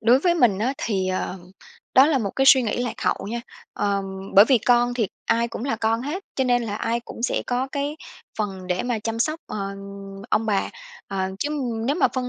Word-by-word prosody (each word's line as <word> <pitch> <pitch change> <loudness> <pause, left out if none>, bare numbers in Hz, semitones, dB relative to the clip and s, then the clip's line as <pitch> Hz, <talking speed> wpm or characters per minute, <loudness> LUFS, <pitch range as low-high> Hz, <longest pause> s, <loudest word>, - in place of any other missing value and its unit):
Đối 240 +4 +5
với 345 +2 +3
mình 235 - +3
á 245 +6 +1
thì, 190 -5 -1
ờ, 185 0 -2 0.6
đó 265 +2 +8
là 300 -4 +2
một 200 -4 -2
cái 270 - +3
suy 265 -1 +8
nghĩ 235 +2 -1
lạc 245 - -2
hậu - - 0
nha. 235 0 -2 0.3
Ờ, 200 -1 0 0.3
bởi 200 - +10
vì 255 +1 +4
con 245 +2 +3
thì 225 -5 0 0.2
ai 235 +1 +2
cũng 230 - -6
là 265 -5 -1
con 225 +1 0
hết, 335 +9 -4
cho 265 - +2
nên 245 -1 +2
là 210 -3 -3
ai 230 +2 -1
cũng 235 0 -9
sẽ - - 0
có 255 +2 -1
cái 285 +2 -2 0.4
phần 195 -3 -3
để 180 0 0
mà 245 -2 -1
chăm 225 +1 -3
sóc, 310 +7 0
ờ, - - -5 0.7
ông 225 - +2
bà, 200 -3 +1 0.4
à, 190 -1 -2
chứ 290 - -1 0.4
nếu 285 - +1
mà - - +4
phân 255 -1 -1
235 Hz, 225 wpm, -24 LUFS, 210-260 Hz, 0.7 s, bởi